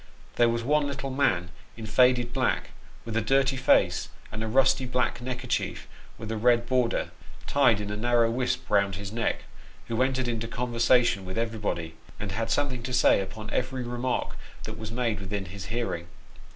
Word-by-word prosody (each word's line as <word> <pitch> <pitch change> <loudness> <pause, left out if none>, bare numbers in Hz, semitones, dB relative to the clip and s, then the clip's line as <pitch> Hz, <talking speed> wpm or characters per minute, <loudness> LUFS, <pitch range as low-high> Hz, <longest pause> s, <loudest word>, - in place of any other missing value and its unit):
There 120 -1 +4
was 115 0 -1
one 150 +3 +2
little 140 -1 -4
man 95 -10 +1 0.3
in 115 - -6
faded 120 +1 +3
black, - - 0 0.3
with 115 -1 -5
a 115 - +2
dirty 135 +4 +2
face 130 0 +3 0.2
and 110 +1 -4
a - - -2
rusty 130 +2 +3
black 125 -1 0
necker 125 0 -4
chief, - - -2 0.3
with 110 0 -6
a 110 - -2
red 120 +1 +3
border, 125 -1 0 0.3
tied 130 -7 +4
in 105 0 -4
a - - -2
narrow 120 0 +3
wisp 125 +2 -1
round 100 -2 +2
his 100 +1 -6
neck, 115 +1 -1 0.5
who 115 +1 0
entered 130 -1 +1
into 115 -1 -2
conversation 120 -2 +2
with 95 +3 -6
everybody, 105 -8 -2 0.3
and 105 -2 -4
had 115 +3 -2
something 130 -4 0
to 125 +1 -5
say 125 -5 +5
upon 105 +3 -7
every 130 0 -1
remark 120 +1 -2 0.3
that 110 - -6
was 110 -1 -6
made 115 -4 -1
within 100 0 -4
his 95 +2 -8
hearing. 110 -6 -3
115 Hz, 180 wpm, -27 LUFS, 105-125 Hz, 0.5 s, say